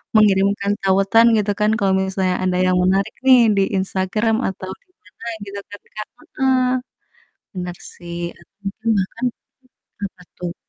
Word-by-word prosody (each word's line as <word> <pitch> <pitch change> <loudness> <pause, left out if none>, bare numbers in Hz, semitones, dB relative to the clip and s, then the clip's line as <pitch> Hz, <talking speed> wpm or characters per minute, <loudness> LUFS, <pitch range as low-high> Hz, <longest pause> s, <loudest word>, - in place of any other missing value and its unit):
mengirimkan 200 -1 +4
tautan 195 +4 +4
gitu 205 -1 +1
kan, 210 +1 +3
kalau 195 -4 +2
misalnya 190 -1 0
ada 185 -1 +1
yang 185 0 +3
menarik 195 +3 +2
nih, 260 -2 +8 0.2
di 195 - +4
Instagram, 195 +4 0
atau 190 0 -5
di - - -48 0.2
mana 185 +5 -12 0.2
gitu 200 0 -6
kan, 205 - -9 0.2
Kak? 215 - -4 0.3
Heeh, 260 -1 +3 0.9
bener 180 -1 -4 0.2
sih 170 0 -8 0.2
atau - - -22 0.2
mungkin 215 +3 -11
bahkan 230 +6 -2 0.8
apa 185 -1 -15 0.2
tuh? 175 0 -4
195 Hz, 145 wpm, -20 LUFS, 185-215 Hz, 0.9 s, nih